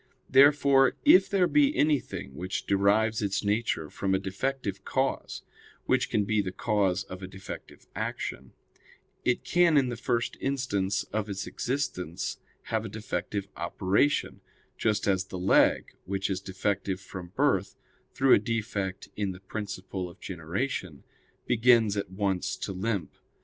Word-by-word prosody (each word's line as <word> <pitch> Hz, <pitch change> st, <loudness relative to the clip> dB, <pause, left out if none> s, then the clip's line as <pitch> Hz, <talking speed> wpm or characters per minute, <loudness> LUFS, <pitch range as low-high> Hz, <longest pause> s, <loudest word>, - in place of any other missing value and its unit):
Therefore, 140 Hz, -1 st, +6 dB
if 190 Hz, +1 st, +7 dB
there 190 Hz, -2 st, +3 dB
be 290 Hz, -, +3 dB
anything 145 Hz, -, 0 dB
which 90 Hz, +6 st, -4 dB
derives 105 Hz, +3 st, +2 dB
its 100 Hz, -1 st, -1 dB
nature 105 Hz, -6 st, 0 dB
from 95 Hz, +5 st, -1 dB
a -, -, +1 dB
defective 100 Hz, 0 st, -3 dB
cause, 135 Hz, +5 st, -2 dB, 0.4 s
which -, -, +2 dB
can 105 Hz, -, +1 dB
be 110 Hz, 0 st, +2 dB
the 95 Hz, -2 st, -4 dB
cause 95 Hz, -3 st, +1 dB
of 95 Hz, -1 st, -9 dB
a 95 Hz, -, -6 dB
defective 95 Hz, 0 st, -10 dB
action, -, -, -4 dB, 0.7 s
it 125 Hz, -, +1 dB
can 175 Hz, -3 st, +4 dB
in 130 Hz, -3 st, +3 dB
the 120 Hz, -, -3 dB
first 115 Hz, 0 st, -1 dB
instant 115 Hz, -8 st, 0 dB
of 105 Hz, 0 st, -1 dB
its 100 Hz, 0 st, -4 dB
existence 105 Hz, -, -3 dB, 0.2 s
have 110 Hz, -1 st, -1 dB
a 110 Hz, -, -5 dB
defective 100 Hz, -1 st, -4 dB
operation; 95 Hz, -, 0 dB, 0.3 s
just 110 Hz, -2 st, 0 dB
as 95 Hz, -1 st, +2 dB
the 95 Hz, -, -7 dB
leg, 90 Hz, +2 st, +3 dB
which 95 Hz, +1 st, -2 dB
is 95 Hz, -1 st, -2 dB
defective 95 Hz, 0 st, -2 dB
from 95 Hz, -2 st, -8 dB
birth, 120 Hz, -9 st, +1 dB, 0.4 s
through 135 Hz, -1 st, +4 dB
a -, -, +7 dB
defect 105 Hz, -3 st, -3 dB
in 100 Hz, -2 st, -2 dB
the 90 Hz, -, -11 dB
principle 95 Hz, -2 st, -5 dB
of 85 Hz, -, -16 dB
generation, 90 Hz, -, -4 dB, 0.4 s
begins 115 Hz, -3 st, +4 dB
at 100 Hz, -3 st, -2 dB
once 95 Hz, -1 st, -1 dB
to -, -, -5 dB
limp. 100 Hz, 0 st, -2 dB
100 Hz, 145 wpm, -28 LUFS, 95-120 Hz, 0.7 s, if